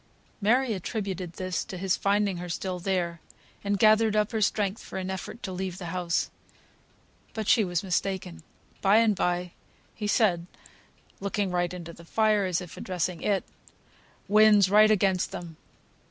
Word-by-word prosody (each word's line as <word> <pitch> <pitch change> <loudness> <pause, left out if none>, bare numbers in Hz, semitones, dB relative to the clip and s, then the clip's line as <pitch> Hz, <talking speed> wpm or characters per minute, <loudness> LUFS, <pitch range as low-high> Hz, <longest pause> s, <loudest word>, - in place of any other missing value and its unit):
Mary 240 +3 +3
attributed 190 -3 -4
this 185 +1 -3
to 190 -4 -8
his 185 0 +1
finding 200 -1 +1
her 175 0 -6
still 180 +1 -3
there, 175 -3 -2 0.4
and 200 0 0
gathered 215 +1 +4
up 210 +1 +2
her 220 -2 -1
strength 205 0 0
for - - -7
an 190 0 -3
effort 190 +5 -7
to 190 - -4
leave 185 -1 -4
the 175 -2 -6
house. 180 -2 -1 1.0
But 220 -2 -3
she 225 - +5
was 175 -2 -1
mistaken. 185 - -2 0.4
By 195 +2 +5
and 225 -2 +4
bye, 180 -1 -1 0.4
he 210 - -4
said 180 -6 +2 0.7
(looking 200 -1 -1
right 175 -1 0
into 170 -2 -8
the 170 - -14
fire, 215 +2 +2
as 180 -1 0
if 175 -2 -10
addressing 180 -2 -3
it), 200 -2 +1 0.8
"Wind's 210 -2 +6
right 215 +1 +7
against 195 -3 +2
them!" 165 -3 -8
190 Hz, 160 wpm, -27 LUFS, 180-210 Hz, 1.0 s, right